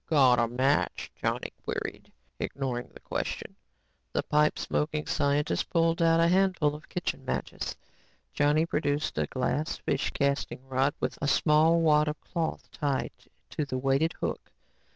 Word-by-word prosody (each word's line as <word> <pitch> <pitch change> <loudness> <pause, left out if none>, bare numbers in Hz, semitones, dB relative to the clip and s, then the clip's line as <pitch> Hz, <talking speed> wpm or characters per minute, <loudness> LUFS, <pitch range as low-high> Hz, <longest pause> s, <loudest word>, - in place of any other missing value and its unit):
"Got 130 -6 +5
a 120 - +3
match?" 130 +4 0
Johnny - - -2
queried, - - -5 0.3
ignoring 125 -3 -3
the - - -13
question. - - -4 0.6
The - - 0
pipe 150 0 +2
smoking 150 0 -1
scientist 145 +2 0
pulled 165 -1 +2
out 165 0 +4
a 165 - +5
handful 180 -4 +3
of 150 +1 -10
kitchen 175 -6 -3
matches. 130 - -3 0.6
Johnny 150 +2 +3
produced 150 -2 -1
a - - +1
glass 140 +4 -1
fish - - -1
casting 140 -2 -1
rod 135 +2 +1
with - - -3
a 145 - 0
small 160 +3 +4
wad 150 -1 +4
of 150 0 -3
cloth 165 -2 -3
tied 140 -4 -1 0.4
to 150 - -1
the 135 -3 -3
weighted 135 +5 +2
hook. - - -4
150 Hz, 150 wpm, -28 LUFS, 135-160 Hz, 0.6 s, Got